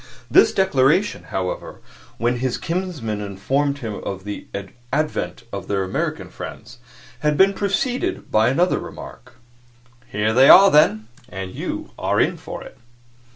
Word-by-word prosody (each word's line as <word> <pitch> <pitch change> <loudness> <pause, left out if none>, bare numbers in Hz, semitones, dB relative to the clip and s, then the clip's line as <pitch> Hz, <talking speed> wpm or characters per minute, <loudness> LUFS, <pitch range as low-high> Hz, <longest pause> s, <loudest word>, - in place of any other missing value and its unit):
This - - +6
declaration, 185 +1 +2
however, 95 -1 -4 0.4
when 120 +2 0
his 125 0 -1
kinsman 165 - -3
informed 135 +9 -1
him 115 -6 -5
of 95 -1 -5
the 105 0 -7 0.4
advent 150 -3 -2
of 100 - -5
their 100 -1 0
American 95 - -3
friends, 120 +3 -9 0.4
had 150 -1 +1
been 195 +1 +5
preceded 250 - -2
by 110 +2 +4
another 170 +8 +2
remark. - - -10 0.7
"Here 105 +1 0
they 130 +3 +6
are, 195 0 +9
then, 110 -7 +4 0.2
and 95 -3 -6
you - - -5
are - - +1
in - - +2
for - - -8
it." - - -14
130 Hz, 140 wpm, -21 LUFS, 105-170 Hz, 0.7 s, are